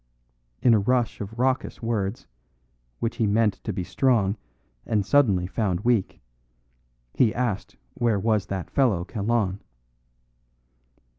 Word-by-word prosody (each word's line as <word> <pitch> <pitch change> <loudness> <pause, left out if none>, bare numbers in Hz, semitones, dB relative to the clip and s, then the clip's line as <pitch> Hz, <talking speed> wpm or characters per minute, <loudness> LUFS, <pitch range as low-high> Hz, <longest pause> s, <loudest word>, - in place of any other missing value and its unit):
In 120 - +6
a 110 - +5
rush 120 +3 0
of 105 +3 -7
raucous 130 -1 -1
words, 110 -2 -2 0.7
which 115 - -3
he 110 - +2
meant 105 0 +1
to - - -2
be 95 -2 -3
strong 110 -2 +2 0.5
and 105 -3 0
suddenly 105 -8 +3
found 95 -2 -1
weak, 115 -4 +1 0.9
he 115 -4 +2
asked 120 -6 -2 0.2
where 115 -4 +1
was 105 -2 +1
that 95 -3 -5
fellow 110 -11 +2
Kalon. 105 -2 -1
110 Hz, 125 wpm, -25 LUFS, 100-120 Hz, 0.9 s, In